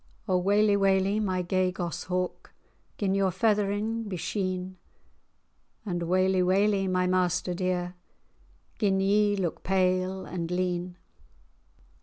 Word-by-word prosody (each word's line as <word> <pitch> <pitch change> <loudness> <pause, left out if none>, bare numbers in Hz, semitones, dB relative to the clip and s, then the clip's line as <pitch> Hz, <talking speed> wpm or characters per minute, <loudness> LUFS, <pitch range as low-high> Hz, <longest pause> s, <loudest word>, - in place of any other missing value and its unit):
"O 185 - +2
waly, 205 +3 +3
waly, 195 +1 +2
my 185 -3 -1
gay 185 +1 +1
goss 175 -3 -4
hawk, 180 -1 -3 0.5
Gin 195 -2 0
your 195 -1 +2
feathering 210 +3 0
be 185 - -3
sheen!" 185 0 -3 1.1
"And 175 -4 -2
waly, 185 +1 +2
waly, 195 +2 +2
my 185 0 +1
master 180 0 +1
dear, 180 0 -2 0.9
Gin 195 -3 +2
ye 205 +1 +3
look 180 -5 -3
pale 185 0 0
and 170 -2 -4
lean! 180 0 -2
185 Hz, 120 wpm, -27 LUFS, 180-195 Hz, 1.1 s, waly